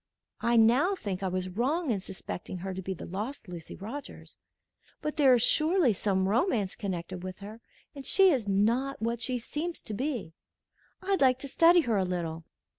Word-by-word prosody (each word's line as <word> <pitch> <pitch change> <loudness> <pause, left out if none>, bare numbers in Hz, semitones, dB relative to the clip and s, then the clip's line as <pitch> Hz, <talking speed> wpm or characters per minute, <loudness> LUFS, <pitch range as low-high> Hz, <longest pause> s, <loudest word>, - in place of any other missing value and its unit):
I 235 0 +2
now 250 - +4
think 200 - -4
I 190 - -1
was 185 0 -2
wrong 260 - 0
in 205 - 0
suspecting 185 -1 -7
her 190 +2 -4
to 190 - -5
be 190 +1 -4
the - - -8
lost 215 +6 -5
Lucy 170 -2 -8
Rogers; 240 +9 -8 0.6
but 300 -1 -3
there 270 -4 +6
is 235 - +2
surely 315 - +3
some 190 -1 0
romance 220 - +1
connected 185 -3 -5
with 185 0 -6
her, 210 +3 -10 0.3
and 275 - -8
she 385 +5 +5
is 250 -8 0
not 235 +8 +1
what 230 +1 -2
she 250 +2 0
seems 310 +8 -4
to 215 - -4
be. 240 - -3 0.7
I'd 390 -2 0
like 255 -2 +5
to 280 - -6
study 335 +5 +5
her 230 -8 0
a 190 - +2
little." 170 -3 -3
225 Hz, 190 wpm, -29 LUFS, 190-275 Hz, 0.7 s, there